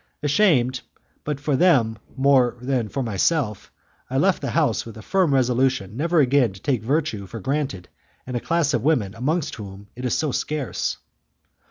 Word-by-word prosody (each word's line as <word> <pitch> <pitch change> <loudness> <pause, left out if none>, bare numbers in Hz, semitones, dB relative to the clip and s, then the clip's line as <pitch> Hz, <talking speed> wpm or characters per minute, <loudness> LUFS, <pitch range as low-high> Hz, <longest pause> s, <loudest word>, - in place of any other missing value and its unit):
Ashamed, 135 -6 +3 0.4
but 150 -2 -3
for 145 0 0
them 130 -10 +3 0.2
more 130 -3 +3
than 125 -3 -1
myself, 110 - 0 0.4
I - - -1
left - - +2
the - - -2
house - - +1
with 115 -1 -10
a 110 - -10
firm 185 - +2
resolution 125 -5 +1
never 165 +4 +2
again 130 -5 +3
to 95 - -12
take 130 -1 0
virtue 125 -5 -1
for 115 - -7
granted 135 -6 -2 0.4
in 125 - -6
a 120 - 0
class 165 0 0
of 120 - +1
women 125 -10 +1
amongst 145 +8 -1
whom 100 -1 -10
it 125 - -8
is 125 - 0
so 155 -3 0
scarce. 150 -1 -2
130 Hz, 170 wpm, -23 LUFS, 115-150 Hz, 0.4 s, Ashamed